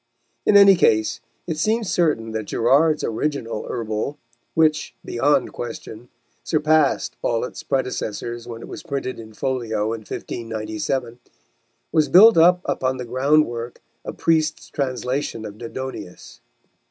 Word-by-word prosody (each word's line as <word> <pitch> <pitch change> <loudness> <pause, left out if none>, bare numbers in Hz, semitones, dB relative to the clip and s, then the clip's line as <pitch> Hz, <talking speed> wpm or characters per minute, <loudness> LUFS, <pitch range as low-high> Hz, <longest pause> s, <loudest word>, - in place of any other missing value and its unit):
In 205 - +7
any 200 -1 +9
case 110 -11 +2 0.2
it 160 -3 -3
seems 215 +3 0
certain 145 -10 +1
that 110 -1 -3
Gerard's 145 +9 +3
original 115 -2 -2
Herbal, 115 +4 -3 0.4
which, 155 -1 +2
beyond 145 +5 +1
question, 120 0 -7 0.3
surpassed 155 -2 +2
all 115 -1 0
its - - -8
predecessors 120 -3 -3
when 115 -1 -7
it - - -9
was - - -8
printed 140 -6 -4
in 110 -1 -11
folio 115 -4 -1
in 115 - -4
1597, 115 +3 -4 0.7
was 155 -2 +2
built 215 +5 +8
up 180 +2 +5
upon 130 0 -1
the 125 - -5
ground 140 +6 +3
work 120 0 -6 0.2
of - - -7
Priest's 160 -2 +1
translation 130 -3 -2
of 105 0 -9
Dodonaeus. 125 -5 -8
130 Hz, 130 wpm, -22 LUFS, 115-155 Hz, 0.7 s, any